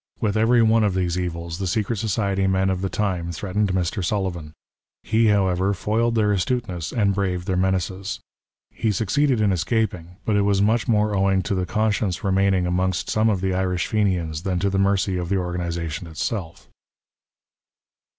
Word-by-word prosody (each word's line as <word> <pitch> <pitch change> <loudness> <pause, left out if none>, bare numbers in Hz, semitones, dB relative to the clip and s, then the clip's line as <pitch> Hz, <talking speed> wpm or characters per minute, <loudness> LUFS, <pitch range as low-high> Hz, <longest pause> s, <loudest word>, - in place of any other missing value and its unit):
With 105 -1 0
every 115 +2 +4
one 110 0 +4
of 100 -3 +1
these 90 -2 0
evils 85 -1 -4
the 95 - -2
secret 110 +4 -1
society 100 -2 0
men 95 0 +2
of 95 -1 -2
the 95 - -1
time 90 -5 -2
threatened 100 +4 -1
Mr. 95 +2 -1
Sullivan. 85 -5 -2 0.5
He, 110 +1 +2
however, 95 -1 +2
foiled 115 +4 0
their 105 -2 +2
astuteness, 95 -4 -2
and 100 -4 +1
braved 90 -3 -1
their 95 - -1
menaces. 95 +1 -1 0.5
He 110 - -1
succeeded 120 +6 +1
in 105 -2 +3
escaping; 90 -1 -1
but 110 - +1
it 100 - +3
was 100 -1 +2
much 110 +5 +2
more 105 -2 +2
owing 95 -1 +2
to 95 - -2
the 90 -2 -1
con 110 0 +1
science 95 -5 -2
remaining 95 -1 +2
amongst 90 0 -1
some 110 +1 +2
of 100 -4 0
the 95 -1 0
Irish 90 -2 0
Fenians 90 -7 0
than 90 0 -1
to 100 +2 0
the 95 - 0
mercy 100 -1 +1
of 90 -1 -3
the 100 - +1
organization 85 -2 -3
itself. 80 - -4
95 Hz, 180 wpm, -23 LUFS, 90-105 Hz, 0.5 s, every